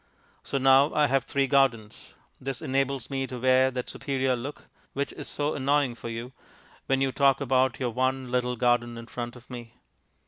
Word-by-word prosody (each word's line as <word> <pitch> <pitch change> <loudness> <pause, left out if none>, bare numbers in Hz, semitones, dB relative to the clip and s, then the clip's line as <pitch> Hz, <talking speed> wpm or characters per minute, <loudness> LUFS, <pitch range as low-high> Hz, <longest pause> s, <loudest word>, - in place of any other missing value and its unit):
So - - -3
now 135 +2 +5
I 150 - +4
have 135 -1 +1
three 140 -1 +1
gardens. 125 -6 0 0.2
This 135 -1 -4
enables 135 0 -1
me 135 -1 -2
to 130 - -6
wear 130 +1 +4
that 125 -1 -4
superior 135 -2 -1
look 135 +5 -7 0.3
(which 140 +1 -2
is - - -7
so 145 +1 -1
annoying 140 -1 +1
for 115 0 -8
you) 115 +2 -6 0.6
when 135 0 +1
you 135 -1 +2
talk 135 -1 +3
about 130 -2 +1
your 125 -3 -1
one 130 +1 -1
little 125 0 0
garden 120 -1 +1
in 115 - -8
front 120 0 -6
of 125 0 -15
me. 120 -2 -9
130 Hz, 185 wpm, -27 LUFS, 120-135 Hz, 0.6 s, now